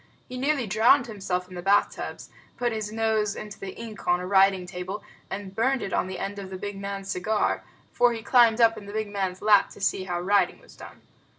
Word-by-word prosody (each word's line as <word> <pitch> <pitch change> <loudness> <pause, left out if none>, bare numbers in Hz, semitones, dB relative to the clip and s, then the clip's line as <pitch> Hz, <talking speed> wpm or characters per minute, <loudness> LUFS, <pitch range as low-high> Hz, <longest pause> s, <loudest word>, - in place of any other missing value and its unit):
He 255 - -8
nearly 270 0 0
drowned 225 +6 +4
himself 190 -5 -3
in 185 - -13
the 175 - -6
bath 200 +3 +3
tubs, - - -7 0.3
put 240 -1 0
his 215 -2 -3
nose 220 -2 0
into 210 -1 -8
the 190 -1 -7
ink 225 -3 -9
on 175 0 +3
a 180 - -5
writing 190 -1 +4
table, 180 +3 -6 0.3
and 195 -1 -6
burned 260 +5 +1
it 195 - -4
on - - +1
the 185 - -5
end 200 +1 -4
of 195 -1 -7
the 190 - -6
big 205 +2 -5
man's 195 0 -5
cigar, 210 +4 0 0.3
for 245 0 +4
he 225 -1 -5
climbed 235 -2 +5
up 225 -1 +4
in 200 - -13
the 205 - -8
big 215 -1 -2
man's 190 -2 -3
lap 210 -2 +5
to - - -13
see 195 -1 0
how 175 -2 -2
writing 190 0 +2
was - - -18
done. - - -12
205 Hz, 230 wpm, -26 LUFS, 190-220 Hz, 0.3 s, climbed